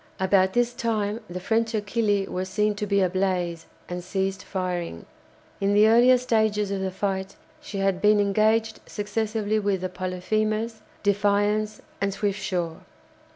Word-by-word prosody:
About 190 0 +3
this 240 0 +2
time 220 -3 -1
the 180 +1 -5
French 225 +4 0
"Achille" 205 -1 +1
was 185 +1 -3
seen 210 +2 +1
to 210 0 -4
be 200 0 +2
ablaze 180 -2 0 0.2
and 180 0 -5
ceased 190 +1 -2
firing. 180 - -3 0.5
In 200 +1 +2
the 210 +1 +6
earlier 240 +3 +6
stages 220 -4 +1
of 195 -1 -2
the 190 - -1
fight 190 0 -3 0.3
she 200 - -7
had 195 -1 0
been 210 0 +5
engaged 220 +2 +2
successively 215 0 -1
with 200 -3 0
the 185 - -2
"Polyphemus," 215 +5 -2 0.2
"Defiance," 205 +1 +1 0.2
and 200 0 +1
"Swiftsure." 190 -5 -2
205 Hz, 145 wpm, -25 LUFS, 190-215 Hz, 0.5 s, the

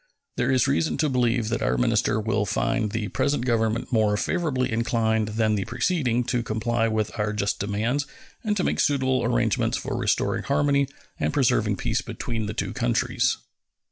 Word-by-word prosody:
There - - 0
is 130 0 +3
reason 140 +4 +1
to 155 - +1
believe 120 -3 +1
that 115 - -1
our - - +1
minister 110 -3 +2
will 105 -1 0
find 110 +2 0
the 110 -2 -2
present 140 +4 0
Government 115 -1 0
more 105 -2 +3
favorably 145 - 0
inclined 110 -1 +1
than 110 -1 +2
the 100 -2 -1
preceding 125 -1 0
to 125 0 -1
comply 115 +1 0
with 110 -1 -1
our 105 0 0
just 100 -1 -1
demands 110 +8 -1 0.4
and 210 -2 0
to 180 - +1
make - - 0
suitable 130 -2 +2
arrangements - - +1
for - - -4
restoring - - 0
harmony 140 -1 +2 0.3
and - - 0
preserving 115 -7 +2
peace - - -1
between 115 -3 -4
the 105 - -5
two - - -2
countries. 120 -2 +1
115 Hz, 170 wpm, -25 LUFS, 110-130 Hz, 0.4 s, is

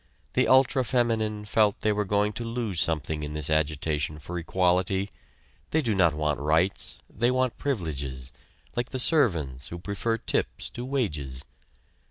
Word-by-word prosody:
The - - +3
ultra 130 0 +5
feminine 110 -4 0
felt 105 -1 +2
they 110 - +2
were 105 0 0
going 105 +2 +1
to 120 - -5
lose 115 -6 -1
something 80 -1 0
in 75 0 -5
this 75 0 +1
agitation 75 0 0
for 85 +4 -5
equality. 95 +3 +1 0.6
They 160 0 +1
do 115 -4 +1
not 85 -6 +3
want 75 -1 0
rights 80 +6 +1
they 120 +4 +1
want 130 -1 0
privileges 70 - -3 0.4
like 120 +1 -1
the 130 - -3
servants 85 - +2
who 85 - -6
prefer 100 +5 -2
tips - - -1
to 120 - -6
wages. 75 - -2
95 Hz, 155 wpm, -27 LUFS, 75-115 Hz, 0.6 s, ultra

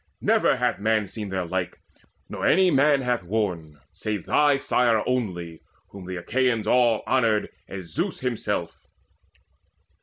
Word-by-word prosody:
Never - - +2 0.2
man 110 +1 +2
Hath 100 - -9
seen 105 -3 -6
their 95 -2 -2
like, 90 +1 -3 0.5
nor - - -7
any 185 +1 +4
man 145 0 +4
hath 125 -3 0
worn, 90 -6 -3
Save 105 -4 -4
thy 145 -2 +3
sire 120 -5 +2
only, 90 -10 -3 0.3
whom 95 -2 -11
the 95 - -5
Achaeans 115 +4 0
all 120 -3 +3
Honoured 115 -5 +1 0.2
as 95 -4 -8
Zeus 175 +6 -2
himself. 125 -3 -3
110 Hz, 140 wpm, -24 LUFS, 95-125 Hz, 0.5 s, any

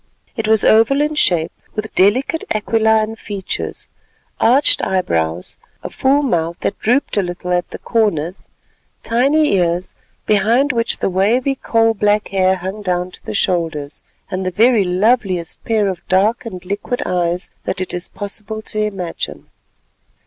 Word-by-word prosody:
It 220 - -2
was 220 -1 +3
oval 225 +6 +4
in 300 +1 +1
shape, 175 - +2 0.2
with 215 0 -4
delicate 255 - +2
aquiline 220 0 +2
features, 200 -4 -5 0.5
arched 265 +5 +4
eyebrows, 85 - -1 0.3
a - - -6
full 275 +2 +2
mouth, 170 - 0
that - - -2
drooped 245 +1 +1
a - - +4
little 180 0 -5
at 175 0 0
the - - -7
corners, 190 -7 -1 0.5
tiny 275 +6 +2
ears, 175 -1 0 0.3
behind 230 +7 +3
which 230 -1 0
the - - -1
wavy 230 +9 +2
coal 225 -3 +1
black 210 0 +1
hair 190 -1 +2
hung 190 +3 -6
down 180 -2 -1
to - - -14
the - - -5
shoulders, 160 -7 -1 0.3
and 185 +1 -2
the 185 - 0
very 220 +3 +4
loveliest 185 -2 0
pair 220 -3 +1
of 185 -2 -3
dark 210 +6 +2
and 185 -4 -8
liquid 205 +6 -3
eyes 175 0 -1
that - - -2
it 185 - -4
is 175 0 -3
possible 215 +2 -6
to 215 - -5
imagine. 195 -5 -4
205 Hz, 150 wpm, -18 LUFS, 180-225 Hz, 0.5 s, oval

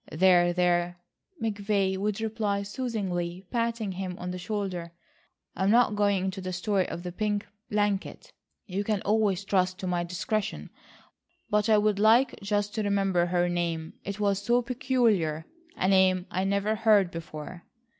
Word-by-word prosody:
"There, 175 +1 +4
there," 175 0 +1 0.4
McVay 205 -3 0
would 200 +2 -2
reply 215 -2 -1
soothingly 195 -6 -3
patting 230 -3 -1
him 185 -1 -5
on 180 0 -5
the 180 - -5
shoulder, 180 -3 -4 0.6
"I'm 190 +2 +1
not 230 -1 +4
going 200 -2 +2
into 190 0 -3
the 185 0 -4
story 190 +1 0
of 175 - -6
the 180 - -5
pink 205 +2 -1 0.2
blanket. 205 -2 -1 0.3
You 195 +1 -2
can 210 -2 -1
always 205 -2 +1
trust 185 -2 +1
to 195 - -6
my 175 -1 0
discretion. 180 - -3 0.8
But 210 +1 +2
I 215 - +6
would 210 -1 +2
like 230 +4 +4
just 205 0 -1
to 220 - -1
remember 195 -4 +1
her 175 0 +1
name. 170 -2 -2
It 200 +1 -5
was 200 -1 +1
so 240 +4 +2
peculiar,—a 240 - -1
name 190 -1 +4
I 185 +1 -1
never 200 +2 +1
heard 210 -5 +4
before." 165 +1 -8
195 Hz, 155 wpm, -28 LUFS, 180-210 Hz, 0.8 s, I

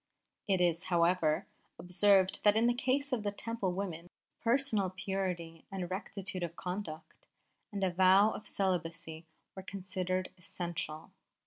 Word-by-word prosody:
It 190 -3 +3
is, 170 -1 +2
however, 170 0 +2 0.3
observed 190 +1 +3
that 205 0 +6
in 225 +1 +4
the 240 - +4
case 265 +3 0
of 230 -4 0
Temple 230 -5 -2
women 175 -3 -4 0.3
personal 230 -5 +2
purity 185 -3 -3
and 185 -2 -4
rectitude 190 -1 -4
of 170 -1 -3
conduct 180 -4 -6 0.4
and 200 -1 -3
a 185 - +2
vow 190 +4 +6
of 210 - -7
celibacy 165 -3 -2 0.3
were 190 - -6
considered 185 -1 -3
essential. 170 -3 -5
185 Hz, 130 wpm, -33 LUFS, 175-200 Hz, 0.4 s, that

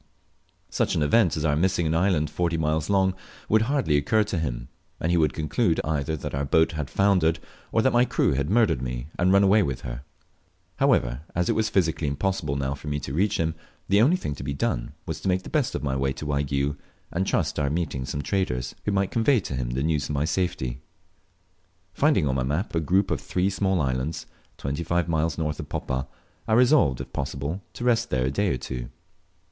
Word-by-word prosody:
Such - - 0
an 80 - +2
event 85 +1 +3
as 75 - -1
our 75 -2 +2
missing 90 +1 +1
an 80 - +1
island 85 -3 +1
forty 85 -1 0
miles 80 +1 0
long 95 -2 +3 0.3
would 110 0 +4
hardly 125 - +1
occur 105 +10 +2
to 100 -4 -3
him, - - -3 0.3
and 85 - 0
he 85 - +3
would 75 -3 +3
conclude 80 - +1
either 75 0 -1
that - - -6
our 70 +1 -1
boat 80 +3 +3
had 75 -3 -4
foundered, 90 -5 +3 0.3
or 115 - +2
that 130 - +3
my 120 0 +5
crew 125 - +1
had 70 +2 -1
murdered 110 - +3
me 60 +2 -4
and 90 +1 +3
run 100 +1 +5
away 100 +2 +5
with 70 -9 -2
her. - - -6 0.8
However, - - +2
as 90 +1 +1
it - - +5
was 110 0 +1
physically 80 -4 +1
impossible 80 0 -1
now 70 0 -1
for 70 +2 -10
me 75 0 -1
to 70 -1 -6
reach 100 +6 +1
him, 80 -1 0 0.4
the 100 +2 +5
only 145 +10 +5
thing 75 - -4
to 65 - -8
be 70 +1 -3
done - - -2
was 80 - -5
to - - -3
make 95 0 +1
the - - -9
best 145 -5 0
of - - -3
my 70 -2 -1
way 65 0 0
to 75 - -7
Waigiou, 70 0 -1 0.3
and 95 +3 -1
trust - - 0
to - - +1
our 70 - +1
meeting 75 -4 -2
some 70 +3 -4
traders, 65 -11 -1
who 105 - +1
might 95 -1 +1
convey 120 +3 +3
to 70 - -5
him 65 -2 -2
the 65 +3 -1
news 75 -2 0
of 75 - -2
my 70 +2 +1
safety. 70 -8 -2 1.1
Finding 75 - +3
on 65 - +1
my 65 -1 0
map 75 - -2
a 85 - +2
group 95 +5 +1
of - - -1
three 95 +2 0
small 95 -1 +1
islands, 70 +4 -2 0.3
twenty 70 +3 -3
five 85 +1 0
miles 80 -2 0
north 75 -2 -2
of - - -7
Poppa, 65 +1 -3 0.4
I 110 - +1
resolved, 125 - +4
if - - -9
possible, 70 +6 -3
to - - -7
rest 120 -1 +2
there 65 -1 +1
a 65 - 0
day 100 +8 0
or - - 0
two. - - -6
80 Hz, 225 wpm, -25 LUFS, 70-95 Hz, 1.1 s, my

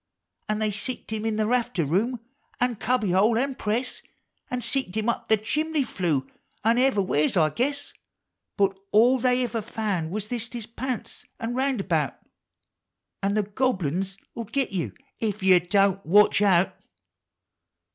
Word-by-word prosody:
An' 215 - +1
they 215 -1 0
seeked 220 +3 -5
him 220 0 -3
in 220 - 0
the 215 0 +1
rafter 240 -7 +1
room, 220 - 0 0.4
an' 245 -2 +1
cubby 235 -5 +1
hole, 210 +5 +4
an 270 +3 0
press, 235 +2 -2 0.5
An' 250 0 -2
seeked 260 -7 -2
him 220 +1 -1
up 235 - -1
the 220 - +5
chimbly 300 +8 0
flue, 160 - -1 0.4
an' 230 +2 +3
ever' 255 -6 +3
wlieres, 155 -1 +1
I 155 -2 +4
guess; 280 - -2 0.6
lint 195 -2 +2 0.2
all 245 +5 +5
they 250 +1 +2
ever 235 -2 -2
found 205 -7 -2
was 210 +3 -4
thist 240 +1 -4
his 235 -3 -5
pants 250 +1 -5 0.2
an' 230 +1 -3
roundabout! 195 - 0 1.0
An' 200 +1 0
the 215 - +2
Gobble 210 -2 0
uns 190 +6 -2 0.2
'11 230 -2 -6
git 270 -2 0
you 185 -4 -2 0.3
Ef 210 -3 -2
you 185 -1 +7
Don't 195 +2 +2
Watch 205 +4 +5
Out 190 -3 +3
215 Hz, 160 wpm, -25 LUFS, 195-245 Hz, 1.0 s, you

